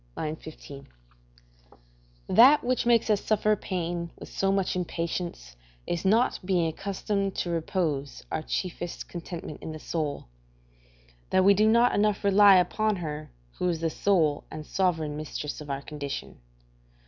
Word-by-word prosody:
i. 155 Hz, 0 st, -2 dB
15.] 150 Hz, -3 st, -11 dB, 1.4 s
That 270 Hz, +6 st, +7 dB
which 250 Hz, -1 st, 0 dB
makes 230 Hz, -2 st, +4 dB
us 205 Hz, -, +1 dB
suffer 215 Hz, 0 st, +2 dB
pain 175 Hz, -3 st, -3 dB
with -, -, -9 dB
so 195 Hz, 0 st, 0 dB
much 195 Hz, -2 st, 0 dB
impatience 170 Hz, -, -4 dB, 0.3 s
is 170 Hz, -, -2 dB
the 190 Hz, -, +2 dB
not 230 Hz, +5 st, +3 dB
being 180 Hz, -2 st, +1 dB
accustomed 195 Hz, +3 st, -2 dB
to 175 Hz, -, -2 dB
repose 160 Hz, -5 st, -2 dB
our 160 Hz, -, -1 dB
chiefest 175 Hz, +1 st, -4 dB
contentment 170 Hz, -3 st, -7 dB
in 160 Hz, -, -6 dB
the 155 Hz, -, -8 dB
soul; 150 Hz, -3 st, -3 dB, 1.0 s
that 185 Hz, 0 st, +3 dB
we 200 Hz, -, +7 dB
do 210 Hz, +2 st, +3 dB
not 235 Hz, +2 st, +4 dB
enough 210 Hz, 0 st, +1 dB
rely 200 Hz, 0 st, +7 dB
upon 215 Hz, +4 st, +2 dB
her 155 Hz, -4 st, -5 dB, 0.3 s
who 180 Hz, -, +1 dB
is 170 Hz, -2 st, -1 dB
the 165 Hz, -1 st, 0 dB
sole 160 Hz, -8 st, +1 dB
and 155 Hz, -, -7 dB
sovereign 160 Hz, -6 st, 0 dB
mistress 150 Hz, -1 st, -5 dB
of 145 Hz, -, -9 dB
our 140 Hz, 0 st, -3 dB
condition. 145 Hz, -2 st, -6 dB
175 Hz, 150 wpm, -27 LUFS, 155-200 Hz, 1.4 s, That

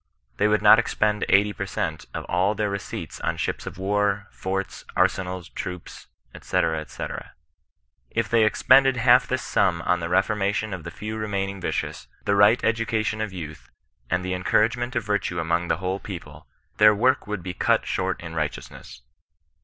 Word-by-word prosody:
They 105 Hz, -, +3 dB
would 105 Hz, 0 st, +2 dB
not 110 Hz, +1 st, +8 dB
expend 105 Hz, -2 st, 0 dB
eighty 105 Hz, +1 st, +4 dB
per 100 Hz, -, -5 dB
cent, 80 Hz, -4 st, -3 dB
of -, -, -5 dB
all 95 Hz, +4 st, +1 dB
their 105 Hz, -2 st, -1 dB
receipts 100 Hz, 0 st, -6 dB
on -, -, -1 dB
ships -, -, -3 dB
of -, -, -7 dB
war, 100 Hz, +1 st, 0 dB
forts, 95 Hz, +1 st, -4 dB
arsenals, 90 Hz, -1 st, 0 dB
troops, 90 Hz, -1 st, -7 dB, 0.3 s
&c. -, -, +1 dB, 0.3 s
&c. -, -, -5 dB, 1.0 s
If 115 Hz, -2 st, -1 dB
they 115 Hz, 0 st, +3 dB
expended 130 Hz, +4 st, +4 dB
half 125 Hz, +2 st, +5 dB
this 130 Hz, 0 st, -2 dB
sum 90 Hz, -4 st, +1 dB
on 90 Hz, -, +1 dB
the 85 Hz, 0 st, -4 dB
reformation 100 Hz, +2 st, 0 dB
of 90 Hz, -4 st, -7 dB
the -, -, -4 dB
few 110 Hz, +1 st, -6 dB
remaining 100 Hz, -2 st, -3 dB
yicious, -, -, -3 dB, 0.2 s
the 100 Hz, -, +2 dB
right 105 Hz, +4 st, +5 dB
education 115 Hz, -1 st, 0 dB
of 110 Hz, -2 st, -3 dB
youth, 80 Hz, -5 st, -8 dB, 0.4 s
and 90 Hz, 0 st, 0 dB
the 95 Hz, -, -2 dB
encouragement 115 Hz, +7 st, +1 dB
of 120 Hz, -, 0 dB
virtue 105 Hz, -4 st, -1 dB
among 85 Hz, +1 st, 0 dB
the -, -, +1 dB
whole 95 Hz, +1 st, -2 dB
people, 75 Hz, -8 st, -9 dB, 0.3 s
their 105 Hz, 0 st, +7 dB
work 130 Hz, +4 st, +2 dB
would 105 Hz, -4 st, -4 dB
be 90 Hz, -1 st, -4 dB
cut -, -, +1 dB
short -, -, -1 dB
in 85 Hz, -1 st, -7 dB
righteousness. 75 Hz, -2 st, -5 dB
100 Hz, 170 wpm, -24 LUFS, 90-110 Hz, 1.0 s, not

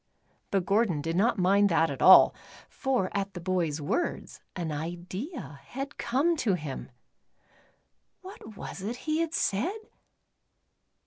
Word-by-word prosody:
But 195 Hz, -3 st, 0 dB
Gordon 200 Hz, -5 st, +2 dB
did 165 Hz, +2 st, -2 dB
not 220 Hz, +5 st, +2 dB
mind 200 Hz, +2 st, +4 dB
that 165 Hz, -2 st, +2 dB
at 135 Hz, -, -6 dB
all, 190 Hz, -, +8 dB, 0.3 s
for 255 Hz, -9 st, -1 dB
at 200 Hz, 0 st, -2 dB
the -, -, -4 dB
bovs 170 Hz, -4 st, -1 dB
words, 150 Hz, -, -3 dB
an 170 Hz, -3 st, -3 dB
idea 175 Hz, -, -6 dB
had 275 Hz, -, -7 dB
come 280 Hz, +8 st, +1 dB
to 215 Hz, -10 st, +1 dB
him. 150 Hz, -6 st, -6 dB, 1.3 s
\\'hat 295 Hz, -, -11 dB
was -, -, -7 dB
it 215 Hz, +5 st, -3 dB
he 310 Hz, 0 st, 0 dB
had 330 Hz, 0 st, -1 dB
said 255 Hz, -, 0 dB
195 Hz, 135 wpm, -28 LUFS, 170-250 Hz, 1.3 s, all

